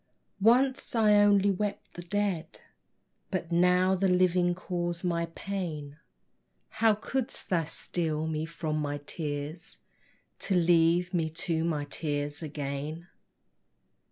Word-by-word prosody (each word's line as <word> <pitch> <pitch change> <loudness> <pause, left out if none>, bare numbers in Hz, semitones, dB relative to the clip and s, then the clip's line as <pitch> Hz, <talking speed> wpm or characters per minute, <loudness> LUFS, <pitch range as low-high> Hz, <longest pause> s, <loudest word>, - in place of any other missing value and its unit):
Once 250 +5 +3
I 215 -2 +5
only 200 -1 +4
wept 205 +2 -3
the 175 - -7
dead, 190 -2 -2 0.7
But 175 -3 -3
now 180 +2 +4
the 190 +1 +2
living 180 -1 +3
cause 175 -1 -3
my 170 -2 0
pain: 160 -7 -5 0.7
How 220 -1 +3
couldst 255 +4 -3
thou 170 -3 +2
steal 160 -1 -2
me 160 0 -2
from 160 -2 -3
my 145 -1 -2
tears, 150 +1 -5 0.6
To 195 - 0
leave 175 +1 +3
me 165 -3 +1 0.2
to 165 -2 0
my 155 -3 -1
tears 145 0 -3
again? 150 +2 -5
175 Hz, 120 wpm, -29 LUFS, 155-190 Hz, 0.7 s, I